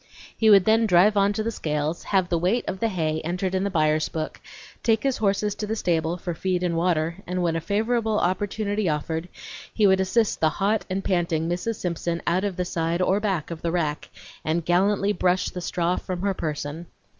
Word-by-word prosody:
He 220 - +3
would 195 -3 +7
then 220 +1 +4
drive 190 +3 +5
on 200 0 +3
to 215 - -2
the 230 - -1
scales, 150 -3 -2
have 190 -3 +2
the 170 -2 0
weight 190 +8 +1
of 190 - -3
the 230 - +1
hay 160 -6 -1
entered 180 +3 -2
in 190 0 0
the 200 - 0
buyer's 155 -3 +1
book, 155 -1 -5 0.4
take 225 -2 +2
his 270 -2 +1
horses 205 0 +1
to 210 - -5
the 220 - -1
stable 170 -4 0
for 175 0 -4
feed 180 +2 -1
and 175 -2 0
water, 165 -1 0
and 180 0 -1
when 165 -1 +1
a 165 - -1
favorable 220 +4 0
opportunity 205 +2 0
offered 160 +3 -2 0.4
he 215 - +2
would 190 -1 +5
assist 205 +4 +1
the 160 - +3
hot 205 +2 +1
and 190 +1 -2
panting 170 -3 0
Mrs. 180 +7 -2
Simpson 170 -2 -2
out 180 +3 +1
of 200 -3 -2
the 180 - -1
side 165 0 -1
or 190 +2 +2
back 190 -7 -2
of 165 - -6
the 170 - -1
rack, 155 -4 -2 0.3
and 160 +1 -1
gallantly 200 +3 +2
brush 180 0 +1
the 180 - -6
straw 175 0 0
from 180 -1 -4
her 200 -1 +1
person. 155 0 -4
180 Hz, 215 wpm, -24 LUFS, 170-205 Hz, 0.4 s, would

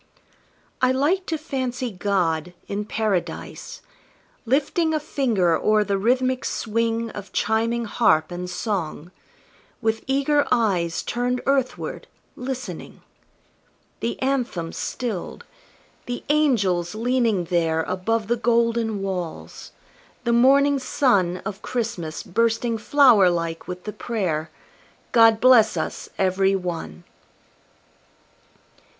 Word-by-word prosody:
I 255 0 +4
like 310 +9 +1
to 320 - -1
fancy 255 -5 -3
God, 180 -4 -1
in 205 +1 -3
Paradise, 210 -4 -3 0.6
Lifting 305 +5 +1
a - - +1
finger 225 - +1
o'er 215 +3 +2
the 200 -1 -1
rhythmic 255 +4 +1
swing 230 0 -1
Of 200 -2 -9
chiming 230 +2 0
harp 190 -8 +2
and 180 +1 -5
song, 180 -3 -3 0.7
with 225 0 -1
eager 280 +2 +2
eyes 190 -9 +1
Turned 245 +1 -1
earthward, 270 -2 -1 0.3
listening 255 0 -6 1.0
The 235 - -3
Anthem 245 -11 -1
stilled 230 -8 -4 0.6
the 245 0 -4
angels 210 - +2
leaning 230 -4 +1
there 165 -2 0
Above 210 +5 -1
the 240 +1 +1
golden 230 -2 +1
walls 180 -4 -5 0.5
the 235 -1 +1
morning 275 +3 +5
sun 200 - +1
Of 200 -3 -5
Christmas 190 -10 -3
bursting 230 +2 0
flower 235 -7 +5
like 170 -1 -3
with 180 0 -6
the 210 - -5
prayer, 175 -9 -2 0.6
"God 225 -2 +6
bless 240 -4 +5
us - - -4
Every 190 +1 +2
One!" 165 - -5
225 Hz, 110 wpm, -23 LUFS, 185-250 Hz, 1.0 s, God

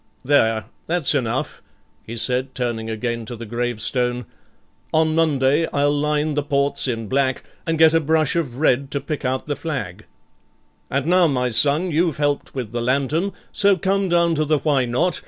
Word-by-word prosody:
There, 115 -6 +2 0.2
that's 170 -3 +1
enough,' 125 -6 -2 0.4
he 115 - -8
said, 125 +3 -1
turning 115 -3 -3
again 115 +1 -3
to 120 - -7
the 115 0 -8
gravestone. 120 +2 -1 0.7
'On 160 0 +2
Monday 155 -1 +2
I'll 145 0 +2
line 150 +1 0
the 145 - 0
ports 140 -1 +1
in 115 -3 -2
black, 130 +2 0 0.2
and 165 0 0
get 160 0 +6
a 165 - +4
brush 160 0 +1
of 140 -8 -2
red 140 -2 +2
to 140 - -2
pick 150 0 -5
out 130 0 -1
the 145 - -2
flag; 135 - -5 0.8
and 140 +1 -1
now, 180 +1 +4
my 125 -4 0
son, 145 +10 +2
you've 165 -1 +1
helped 145 -1 -1
with 125 -5 -4
the 120 0 -3
lantern, 140 +9 0 0.2
so 200 -2 +3
come 195 +2 0
down 170 -1 +3
to 155 -1 +1
the 155 0 +2
Why 140 -3 +1
Not? 125 +10 0
140 Hz, 175 wpm, -21 LUFS, 125-160 Hz, 0.8 s, get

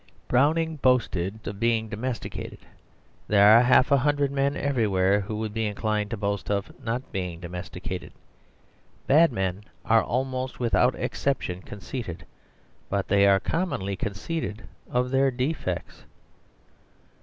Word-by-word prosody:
Browning 155 +5 +2
boasted 110 -7 +1
of 100 -1 -5
being 115 -1 +1
domesticated; 115 +3 -5 0.7
there 105 +1 +7
are 115 - +8
half 125 +3 +4
a 140 - +6
hundred 145 +1 +1
men 140 0 0
everywhere 105 -8 +2
who 105 +2 -5
would 110 -1 -3
be 110 -1 -1
inclined 105 0 -1
to 115 - -4
boast 100 -1 -2
of 100 -1 -1
not 120 +3 -3
being 90 -4 -4
domesticated. 90 +2 -6 0.9
Bad 160 +4 +5
men 95 -2 -2 0.2
are 115 0 +5
almost 130 0 -2
without 125 +1 +2
exception 90 -10 -2
conceited, 100 -2 -7 0.6
but 100 -1 -1
they 100 0 +5
are 100 -1 +5
commonly 100 - -2
conceited 105 - -4 0.3
of 125 +1 0
their 135 0 +3
defects. 130 +5 -3
110 Hz, 130 wpm, -26 LUFS, 100-130 Hz, 0.9 s, are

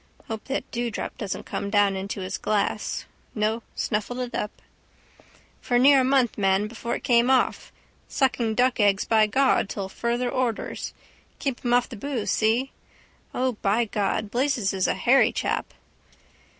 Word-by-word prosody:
Hope 220 -2 -5
that 270 - -4
dewdrop 240 -2 -3
doesn't 200 -4 -4
come 200 - -4
down 205 -1 +3
into 195 +1 -4
his 185 +1 -4
glass. 210 -2 -1 0.3
No, 220 +1 0
snuffled 215 +3 -2
it 250 -1 -4
up. 210 - -4 1.0
—For 245 - +1
near 270 +2 +6
a - - +2
month, 255 -4 +2
man, 195 +1 +2
before 235 +2 -4
it - - -7
came 240 -1 +4
off. 260 -1 +1 0.4
Sucking 240 -5 0
duck 250 +1 +2
eggs 205 -2 +3
by 220 -1 +4
God 260 -2 +2
till 195 -2 -4
further 235 +4 -1
orders. 250 -4 -2 0.4
Keep 270 -4 -3
him 240 - 0
off 245 0 +2
the 240 - -9
boose, 255 -1 -2
see? 230 +5 +1 0.6
O, 255 0 +1
by 215 +4 +2
God, 205 0 -1
Blazes 245 -6 0
is 190 -1 +1
a - - +1
hairy 265 +3 +4
chap. - - -2
230 Hz, 160 wpm, -25 LUFS, 205-250 Hz, 1.0 s, near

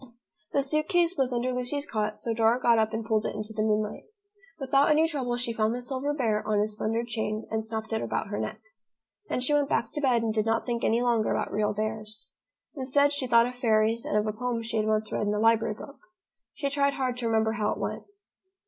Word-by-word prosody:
The 280 - +2
suit 305 +3 +1
case 350 -2 +3
was 265 -4 +1
under 250 +1 -1
Lucy's 250 +4 -1
cot, 215 -3 -2
so 230 +2 -2
Dora 225 +2 +3
got 235 -2 +4
up 220 0 +1
and 220 0 -3
pulled 220 -1 +1
it - - -5
into 215 +1 -5
the 215 - -2
moonlight. 215 -1 0 0.5
Without 275 +1 +3
any 310 +2 +4
trouble 260 -6 -2
she 240 -1 -2
found 220 +1 +1
the 250 - -4
silver 265 +2 -2
bear 225 -7 0
on 210 -1 +2
his 210 0 0
slender 225 +2 -1
chain 220 -2 -3
and 220 0 -1
snapped 220 0 -4
it 220 - 0
about - - -2
her - - -3
neck. - - -4 0.7
Then - - -1
she 255 +4 +1
went 290 -1 +2
back 230 - 0
to 295 - -3
bed 245 -5 +2
and 220 -1 0
did 215 0 0
not 225 - +1
think 235 -2 -2
any 230 +2 +2
longer 235 -3 +2
about - - -1
real 210 0 +1
bears. 215 0 -4 0.4
Instead, 280 +1 +2
she 285 -3 -2
thought 235 -1 +5
of 250 - -4
fairies 225 -2 +2
and - - 0
of 210 - +1
a 215 - -1
poem 235 +1 -2
she 225 0 -2
had 215 0 +1
once 215 0 0
read 210 - -1
in 205 - +1
a - - -1
library 225 -1 +3
book. 280 +5 -11 0.6
She 280 -1 -2
tried 280 0 +2
hard 255 -2 -1
to 240 -2 -2
remember 220 -1 +2
how 210 -1 -1
it - - -2
went. - - -4
230 Hz, 240 wpm, -27 LUFS, 215-255 Hz, 0.7 s, thought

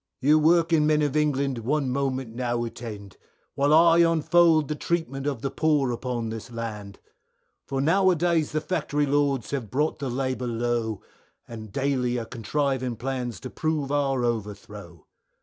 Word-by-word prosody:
You 150 +4 +4
working 165 -1 +3
men 150 -1 +3
of 145 -1 -1
England 140 -4 +1
one 135 +3 -1
moment 130 -3 -2
now 120 -1 -1
attend, 110 -4 -8 0.4
While 140 +1 +1
I 165 +2 +6
unfold 165 -1 +4
the 150 - -2
treatment 150 -3 -2
of 135 -6 -3
the 135 - -2
poor 150 -5 +1
upon 120 -1 -3
this 115 +2 -7
land, 105 -4 -6 0.7
For 135 -1 -2
now 185 +6 +3
a 180 - +3
days 170 -2 +1
the 155 - -1
Factory 150 -4 -1
Lords 140 -3 0
have 130 -7 -3
brought 150 +8 -1
the 140 -2 -3
labour 130 0 -2
low, 115 -2 -2 0.4
And 110 -3 -9
daily 130 -1 0
are 115 - -3
contriving 130 +1 -2
plans 125 -1 -4
to 130 - -7
prove 155 -3 -2
our 135 -3 +1
overthrow. 105 -6 -5
135 Hz, 160 wpm, -25 LUFS, 120-150 Hz, 0.7 s, I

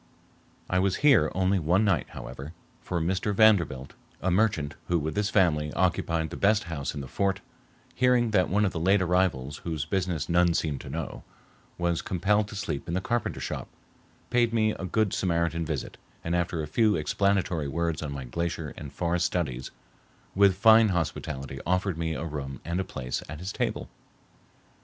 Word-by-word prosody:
I 90 - +1
was 95 0 +2
here 130 - +5
only 95 +1 +2
one 90 +6 +2
night, 85 - +1
however, 70 +4 -8 0.3
for 85 - -2
Mr. 95 +4 -1
Vanderbilt, 85 -12 +3 0.3
a 95 - 0
merchant, 90 -8 +1
who 90 - +2
with 80 0 -3
his 105 0 +1
family 75 -8 +2
occupied 85 -3 0
the - - -6
best 105 +1 +3
house 75 -5 -4
in 70 - -4
the 70 - -7
fort, 95 +5 0 0.5
hearing 125 -2 +3
that 95 -4 +3
one 105 +4 +2
of 95 - 0
the 85 - -4
late 95 +5 +4
arrivals, 85 -7 0
whose 80 -4 -4
business 90 -6 -1
none 85 0 +3
seemed 75 -4 -1
to - - -9
know, - - -5 0.5
was 85 -1 0
compelled 105 +3 +1
to 105 - -9
sleep 85 -8 -4
in 85 - -2
the - - +1
carpenter 120 +3 -2
shop, - - -4 0.6
paid 120 -1 +3
me 110 -1 +2
a 95 - -5
good 105 +2 +1
Samaritan 85 -2 0
visit - - -4 0.3
and 85 +1 -1
after 85 -2 -1
a - - -5
few 105 +7 +3
explanatory 85 -1 0
words 85 +2 -1
on 75 -2 -4
my 70 -1 -5
glacier 80 +3 -3
and 75 -3 -8
forest 85 0 0
studies, 70 -9 -3 0.6
with 100 -1 +5
fine 110 +2 +7
hospitality 70 -6 -3
offered 90 0 0
me 80 -1 -1
a 85 - -4
room 70 -4 -5
and 85 +2 -2
a - - +1
place 65 -8 -4
at 80 - -6
his 90 +5 -5
table. - - -2
85 Hz, 180 wpm, -27 LUFS, 80-100 Hz, 0.6 s, fine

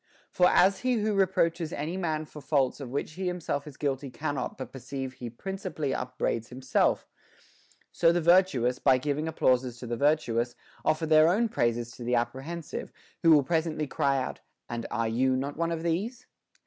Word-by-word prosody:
For 180 - +4
as 190 +1 +4
he 255 0 +1
who 215 -1 0
reproaches 175 -4 +1
any 155 +4 -3
man 160 -4 -1
for 150 0 -11
faults 135 -1 +1
of 135 -4 -6
which 140 +4 -3
he 185 +4 -4
himself 170 -5 -2
is 145 - -10
guilty 140 -1 -2
cannot 135 +1 -3
but 130 - -7
perceive 135 0 -6
he 120 -2 -7
principally 180 - -4
upbraids 125 -3 -2
himself, 130 +1 +1 0.9
so 165 - +4
the 175 - +2
virtuous, 165 -8 +3
by 130 - +4
giving 145 +4 -2
applauses 125 -5 +1
to 125 - -8
the 120 0 -3
virtuous, 120 -5 +1 0.3
offer 155 +1 +1
their 155 0 +6
own 225 +6 +2
praises 120 - 0
to 120 - -7
the 125 +1 +1
apprehensive, 135 +7 -3 0.3
who 165 - +4
will 150 -3 +7
presently 160 +1 0
cry 140 0 +1
out, 130 - -3 0.3
And 120 -1 -4
are 115 -1 -1
not - - -2
you 130 +1 +3
one 145 +6 -2
of 165 -1 -3
these 210 +10 -2
145 Hz, 180 wpm, -28 LUFS, 130-170 Hz, 0.9 s, will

